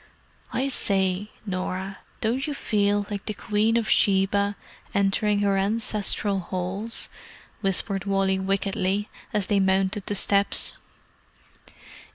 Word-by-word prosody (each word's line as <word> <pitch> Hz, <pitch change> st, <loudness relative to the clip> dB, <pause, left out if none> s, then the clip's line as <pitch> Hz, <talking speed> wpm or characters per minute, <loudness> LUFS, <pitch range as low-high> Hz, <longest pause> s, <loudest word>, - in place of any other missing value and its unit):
"I 270 Hz, +2 st, 0 dB
say, 195 Hz, -4 st, +1 dB, 0.2 s
Norah, 190 Hz, 0 st, -3 dB, 0.2 s
don't 245 Hz, +5 st, 0 dB
you 295 Hz, -, -3 dB
feel 205 Hz, -4 st, +1 dB
like 205 Hz, -1 st, -5 dB
the 215 Hz, -, -2 dB
Queen 215 Hz, +2 st, +1 dB
of 230 Hz, -, 0 dB
Sheba 200 Hz, +1 st, +3 dB, 0.4 s
entering 200 Hz, +1 st, +2 dB
her 200 Hz, -1 st, +2 dB
ancestral 205 Hz, -1 st, +1 dB
halls?" 185 Hz, +5 st, -3 dB, 0.5 s
whispered 195 Hz, 0 st, 0 dB
Wally 195 Hz, -1 st, +1 dB
wickedly, 195 Hz, +1 st, 0 dB, 0.2 s
as 210 Hz, -3 st, 0 dB
they 205 Hz, 0 st, +2 dB
mounted 190 Hz, +1 st, +1 dB
the 205 Hz, -, -1 dB
steps. 200 Hz, 0 st, +2 dB
200 Hz, 115 wpm, -25 LUFS, 195-210 Hz, 0.5 s, Sheba